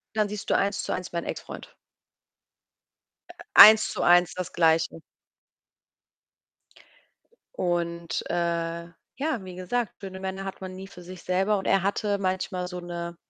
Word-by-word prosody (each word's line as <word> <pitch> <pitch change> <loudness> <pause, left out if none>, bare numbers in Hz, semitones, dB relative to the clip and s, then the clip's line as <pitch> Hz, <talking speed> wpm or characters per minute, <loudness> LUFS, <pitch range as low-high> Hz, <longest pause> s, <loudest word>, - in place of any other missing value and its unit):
dann 215 -1 +1
siehst 210 0 -6
du - - +3
Eins-zu-eins 200 -2 -2
meinen 170 -1 -3
Exfreund. - - -8 1.6
Äh, - - -11 0.2
Eins-zu-eins 175 -5 +7
das 185 -1 -6
Gleiche. 165 -1 +2 2.5
Und, 170 -1 -2
äh, 170 -1 -2 0.3
ja, 270 -7 -2
wie 185 -1 -9
gesagt, 205 +5 -2
schöne 190 -1 -8
Männer 190 0 -5
hat 195 0 -7
man 185 0 -7
nie 190 +1 -9
für 180 -2 -13
sich 180 0 -10
selber 195 +3 +1
und 190 - -6
er 195 -1 +3
hatte 200 +1 0
manchmal 185 -1 -2
so 180 0 -6
'ne 170 -1 -6
185 Hz, 130 wpm, -26 LUFS, 175-195 Hz, 2.5 s, Eins-zu-eins